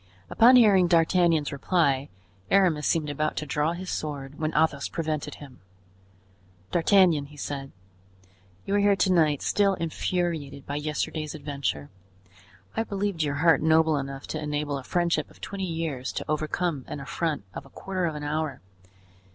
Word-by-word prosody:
Upon 240 +3 +7
hearing 200 -7 +6
D'Artagnan's 170 -2 +3
reply, 140 -2 +1 0.4
Aramis 175 -6 +3
seemed 160 -3 +1
about 155 +2 -1
to 150 - -2
draw 150 +3 0
his 185 +2 -6
sword, 145 -2 -5
when 155 0 -1
Athos 150 -2 +1
prevented 155 -3 -3
him. 135 -4 -13 1.1
"D'Artagnan," 175 -4 +4
he 145 +1 -15
said, 140 -1 -5 0.9
"you 195 - -2
are 205 - +3
here 200 0 +4
to 185 0 +2
night, 155 -5 +2
still 200 -1 +2
infuriated 165 -4 -2
by 145 - -3
yesterday's 155 0 -3
adventure. 140 - -4 0.8
I 225 - +1
believed 200 -5 -2
your 145 -2 0
heart 160 0 +4
noble 160 0 +4
enough 135 -1 -4
to 155 - -3
enable 150 -1 -2
a - - -10
friendship 170 -1 0
of - - -19
twenty 195 -1 -4
years 160 -6 -3
to - - -4
overcome 155 -1 -1
an - - -6
affront 150 - -2
of - - -8
a - - -19
quarter 185 -2 -3
of 160 - -4
an 150 - -6
hour. 150 -2 -2
155 Hz, 160 wpm, -26 LUFS, 145-175 Hz, 1.1 s, Upon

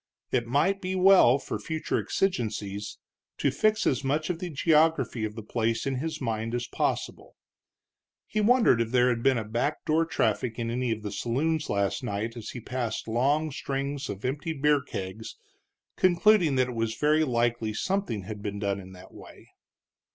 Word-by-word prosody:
It 120 -2 0
might 165 +10 +1
be 185 0 -2
well, 185 -9 +6
for 140 - -5
future 160 -1 -2
exigencies, 105 - -2 0.4
to - - +1
fix 215 0 +1
as 130 +1 +1
much 150 +5 0
of 165 - -5
the 180 - -4
geography 150 -6 +2
of 105 0 -6
the 110 - -7
place 115 +1 -1
in 135 -1 -1
his 160 +4 -3
mind 115 -2 -2
as 120 0 -2
possible. - - -3 0.9
He 215 - -1
wondered 225 - +4
if 115 - -1
there 125 +1 +3
had 120 -2 0
been 135 0 +3
a 115 - -2
back 120 +8 -2
door 160 +2 +2
traffic 125 -7 0
in 115 -1 -2
any 125 0 -1
of 110 -1 -3
the 105 - -4
saloons 150 +9 -1
last 100 -1 0
night 105 +3 -3
as 115 -2 -7
he 125 - -6
passed 120 -2 -4
long 140 +7 +1
strings 140 0 -3
of 100 +2 -6
empty 145 +5 -2
beer 150 0 +2
kegs, 100 -2 -6 0.6
concluding 180 -3 +4
that 130 -1 +2
it - - -5
was 115 -1 -1
very 155 +1 +3
likely 120 -4 0
something 185 - -2
had 105 +1 -7
been 100 -1 -4
done 100 -1 -1
in 95 -1 -11
that 90 - -14
way. - - -14
125 Hz, 180 wpm, -27 LUFS, 110-155 Hz, 0.9 s, well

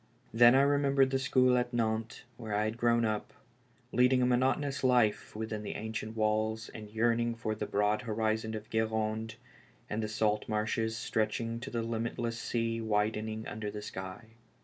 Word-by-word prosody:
Then 120 +2 +7
I 135 - +6
remem 140 -1 +2
bered 135 -1 +4
the 135 - +1
school 130 -1 +3
at 120 0 -2
Nantes, 110 -1 -1
where 110 -4 -4
I 105 - +2
had 110 +1 -1
grown 120 -1 +2
up, 110 -1 -2 0.6
lead 125 +1 +4
ing 125 -1 +3
a - - +4
monotonous 135 +3 +1
life 120 -6 +2
within 110 -1 -4
the 105 - -5
ancient 110 0 -5
walls 110 +1 0
and 105 -1 -9
yearning 115 +1 +1
for 110 -1 -2
the 105 -1 -4
broad 105 +1 +1
horizon 110 -1 -1
of 110 0 -8
Guerande, 110 0 -1 0.6
and 105 +1 -1
the 110 - -2
salt 105 -1 0
marshes 110 +1 -1
stretching 115 +1 -1
to 130 +3 -6
the 115 -3 -2
limitless 115 0 -3
sea 115 -1 -1
widening 110 0 -1
under 105 0 -4
the 105 0 -6
sky. 95 +3 -7
110 Hz, 175 wpm, -31 LUFS, 110-120 Hz, 0.6 s, Then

